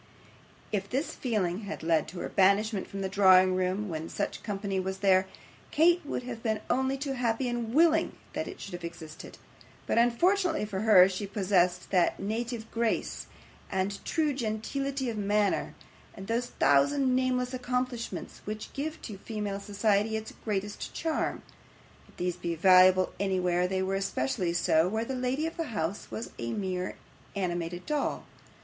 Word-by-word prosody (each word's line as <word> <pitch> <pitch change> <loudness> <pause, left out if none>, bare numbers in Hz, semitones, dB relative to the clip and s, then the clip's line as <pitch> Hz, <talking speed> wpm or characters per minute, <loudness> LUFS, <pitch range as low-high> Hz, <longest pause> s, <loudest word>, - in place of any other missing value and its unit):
If 200 -1 -2
this 275 +5 -1
feeling 200 -7 -1
had 200 - -6
led 160 -2 +2
to 180 - -7
her - - -4
banishment 200 +1 +2
from 195 - -6
the 190 - -1
drawing 185 -1 +6
room 185 +3 0
when 160 -2 -4
such - - -3
company 195 -2 -2
was 190 +1 -3
there, 190 0 +5 0.4
Kate 345 +3 +4
would 285 -3 -4
have 240 -2 -6
been 220 -2 -1
only 265 +2 +1
too 275 0 -3
happy 245 -1 0
and 240 -2 -2
willing 325 +3 +4 0.2
that - - -3
it - - -8
should 195 - -8
have 175 -1 -6
existed, 165 -2 -9 0.5
but - - +2
unfortunately 345 - +2
for 195 -2 -4
her 200 -4 +7
she 195 +1 -4
possessed 185 -3 +1
that 180 -3 +2
native 225 +2 -3
grace 230 -1 -1 0.4
and 195 +1 -2
true 310 -3 0
gentility 265 +3 -2
of 225 -3 -3
manner, 205 0 +1 0.4
and 195 - -8
those 235 +3 -1
thousand 255 - +3
nameless 255 -1 0
accomplishments 250 -1 -3
which 215 +1 -6
give 310 +3 -4
to 205 -4 -7
female 210 -2 -4
society 205 +1 +1
its 220 0 -7
greatest 210 -1 -3
charm; 320 -1 -1 0.6
if - - -22
these 180 -1 -2
be 170 -1 -3
valuable 185 +1 +6
anywhere, 180 -2 +1
they 190 0 -1
were 190 +1 -1
especially 170 -4 -1
so 170 -1 +3
where 220 +4 -1
the 265 - -4
lady 255 +4 -1
of 330 - -4
the 330 - -1
house 200 - -3
was 225 - -6
a 115 0 -3
mere 185 -2 -3 0.4
animated 175 -2 -3
doll. 300 -2 -1
205 Hz, 165 wpm, -29 LUFS, 185-245 Hz, 0.6 s, her